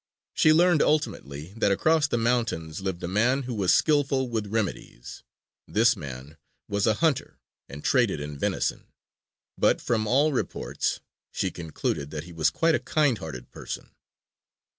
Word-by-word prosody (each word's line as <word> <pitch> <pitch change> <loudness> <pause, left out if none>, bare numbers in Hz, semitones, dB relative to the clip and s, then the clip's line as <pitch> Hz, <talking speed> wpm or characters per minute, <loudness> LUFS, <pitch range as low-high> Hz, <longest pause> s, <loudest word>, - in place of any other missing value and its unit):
She 155 - +5
learned 170 0 +5
ultimately 75 - -1
that 115 -3 +2
across 155 +8 +3
the 120 - -1
mountains 115 -9 -1
lived 95 -2 -4
a - - -2
man 120 +9 +2
who 125 -1 -4
was 100 -5 +2
skillful 140 -4 +2
with 110 -3 -2
remedies. 100 - -4 0.5
This 115 +3 +3
man 70 -2 -9 0.3
was 100 +1 0
a 110 - +3
hunter, 155 -5 0 0.3
and 75 +1 -9
traded - - +2
in 75 0 -6
venison. 70 - -2 0.7
But, - - +3
from 110 -2 -1
all 140 +6 +3
reports, 130 - -2 0.3
she - - -1
concluded 80 -3 -3
that 75 0 -5
he 85 0 -12
was 80 -2 +2
quite 165 - +2
a - - +2
kind 145 -8 +1
hearted 70 -8 -8
person. - - -7
110 Hz, 155 wpm, -26 LUFS, 80-135 Hz, 0.7 s, She